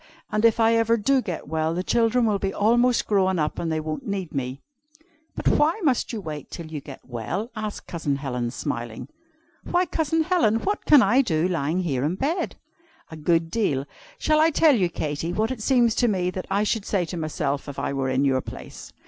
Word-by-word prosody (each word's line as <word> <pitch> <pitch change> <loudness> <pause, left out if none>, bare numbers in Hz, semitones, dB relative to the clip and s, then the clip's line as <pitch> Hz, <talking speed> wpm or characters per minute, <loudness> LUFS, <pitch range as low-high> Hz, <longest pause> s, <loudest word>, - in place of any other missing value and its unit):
And 215 +1 0
if 230 0 +4
I 225 0 +4
ever 230 0 +3
do 265 +5 +2
get 180 -8 -5
well, 160 +1 -1
the 180 - -1
children 235 +3 +2
will 210 -3 +1
be 195 0 -1
almost 240 +4 +3
grown 190 -3 +2
up, 150 -1 -1
and 165 - -2
they 160 - 0
won't 155 - -5
need 195 -5 -3
me." 130 -1 -3 0.8
"But - - -3
why 315 +7 +3
must 265 -6 +1
you 225 - -4
wait 155 -6 -7
till 170 - -7
you 155 -2 -6
get 135 -1 -10
well?" 150 - -4
asked 215 -1 -5
Cousin 155 -5 -2
Helen, 125 -4 -3
smiling. 120 -3 -5 0.5
"Why, 355 +1 +1
Cousin 320 -1 0
Helen, 330 - +2
what 410 +1 -2
can 290 -4 +7
I 260 +3 +4
do 165 -8 +1
lying 170 0 0
here 135 -8 -1
in 155 +5 0
bed?" 300 - -1 0.6
"A - - -7
good 165 +1 +1
deal. 145 -12 0 0.3
Shall 310 -9 +2
I 315 +1 +5
tell 320 -1 +4
you, 185 -6 +1
Katy, 155 +1 -3
what 220 +5 0
it 250 -4 -5
seems 240 -1 +3
to 245 - +3
me 180 -4 0
that 185 0 -6
I 200 +2 +1
should 215 -1 -1
say 190 -4 +1
to 175 - -6
myself 145 -3 -2
if 140 - -8
I - - -2
were 135 -1 -1
in 130 +2 +1
your 130 -1 +2
place?" - - -10
185 Hz, 215 wpm, -24 LUFS, 155-230 Hz, 0.8 s, can